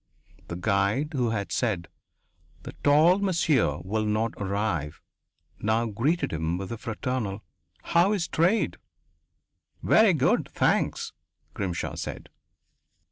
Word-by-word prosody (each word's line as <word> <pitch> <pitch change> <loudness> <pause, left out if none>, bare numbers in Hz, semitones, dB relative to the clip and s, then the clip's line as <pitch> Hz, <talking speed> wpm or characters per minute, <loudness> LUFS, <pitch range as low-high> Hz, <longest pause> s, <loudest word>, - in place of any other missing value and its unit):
The 85 - -5
guide 100 - +1
who 125 -4 +1
had 100 -3 -3
said 100 -9 -1 0.8
"The - - -7
tall 155 +6 +5
monsieur 165 - +2
will 110 +3 -1
not 110 +2 0
arrive" 95 -7 -2 0.6
now 110 +2 +1
greeted 120 - 0
him 80 +2 -1
with 95 +2 -6
a 115 - -4
fraternal: 115 -3 -3 0.4
"How 175 +4 +3
is 180 -5 -1
trade?" 180 +8 +1 1.1
"Very 220 -3 +5
good, 140 -4 +1
thanks," - - 0 0.4
Grimshaw 90 -4 -3
said. - - -6
110 Hz, 115 wpm, -26 LUFS, 100-150 Hz, 1.1 s, tall